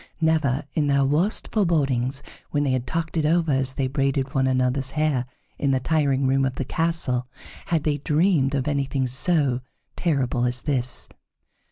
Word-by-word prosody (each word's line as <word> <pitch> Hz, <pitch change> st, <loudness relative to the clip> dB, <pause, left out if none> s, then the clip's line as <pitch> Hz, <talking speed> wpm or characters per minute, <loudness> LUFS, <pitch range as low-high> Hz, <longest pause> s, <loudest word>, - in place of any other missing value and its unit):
Never 155 Hz, -4 st, +1 dB
in 150 Hz, -2 st, +1 dB
their 140 Hz, -1 st, +3 dB
worst 160 Hz, +10 st, +1 dB
forebodings, 140 Hz, -, 0 dB, 0.3 s
when 145 Hz, -1 st, 0 dB
they 140 Hz, -, +1 dB
had 130 Hz, -1 st, -1 dB
talked 165 Hz, 0 st, -3 dB
it 160 Hz, -, +1 dB
over 165 Hz, +1 st, +2 dB
as 135 Hz, -1 st, 0 dB
they 135 Hz, -, 0 dB
braided 135 Hz, 0 st, -1 dB
one 130 Hz, 0 st, +2 dB
another's 130 Hz, +1 st, +1 dB
hair 145 Hz, -5 st, +1 dB, 0.3 s
in 140 Hz, -, +1 dB
the 135 Hz, -1 st, +2 dB
tiring 140 Hz, -1 st, +1 dB
room 135 Hz, +1 st, +2 dB
of 130 Hz, -1 st, -1 dB
the 135 Hz, -, -3 dB
castle, 160 Hz, -6 st, 0 dB, 0.4 s
had 165 Hz, -3 st, 0 dB
they 145 Hz, -1 st, 0 dB
dreamed 150 Hz, -2 st, +2 dB
of 130 Hz, 0 st, -1 dB
anything 140 Hz, -2 st, 0 dB
so 130 Hz, 0 st, +1 dB, 0.3 s
terrible 130 Hz, -7 st, 0 dB
as 125 Hz, 0 st, 0 dB
this. 130 Hz, -4 st, 0 dB
140 Hz, 170 wpm, -24 LUFS, 130-155 Hz, 0.4 s, their